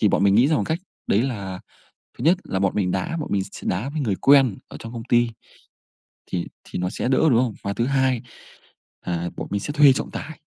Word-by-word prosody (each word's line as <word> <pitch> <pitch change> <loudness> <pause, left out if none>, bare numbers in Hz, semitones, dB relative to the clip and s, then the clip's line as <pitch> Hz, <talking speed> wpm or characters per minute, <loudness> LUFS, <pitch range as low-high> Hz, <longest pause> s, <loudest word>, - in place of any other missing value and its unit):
thì 105 - +4
bọn - - +2
mình 100 - +5
nghĩ 120 +7 +5
ra 155 - +3
một - - 0
cách 160 +1 0 0.3
đấy 105 +4 +3
là 100 -8 -4 0.6
thứ - - -6
nhất 170 +5 +5
là 95 - -2
bọn 95 -1 +1
mình 95 -3 +1
đá, 95 - -2
bọn 155 - -4
mình 100 -2 +1
s - - -10
đá 105 +9 -1
với 150 +1 -3
người 105 -8 0
quen 135 -6 +5
ở - - -10
trong 115 +1 -8
công 115 - -6
ty. 120 0 +4 1.0
Thì 85 -1 -3 0.2
thì - - -6
nó 90 - -1
sẽ 110 - -3
đỡ 130 - +3
đúng 120 - +4
không? 125 -3 +1
Và 100 - -2
thứ 115 - 0
hai, 130 -2 +1 0.8
à, 85 0 -2
bọn - - -4
mình 100 - 0
sẽ 145 - -4
thuê 145 -3 +7
trọng - - -4
tài. 155 -1 -7
115 Hz, 245 wpm, -23 LUFS, 95-135 Hz, 1.0 s, thuê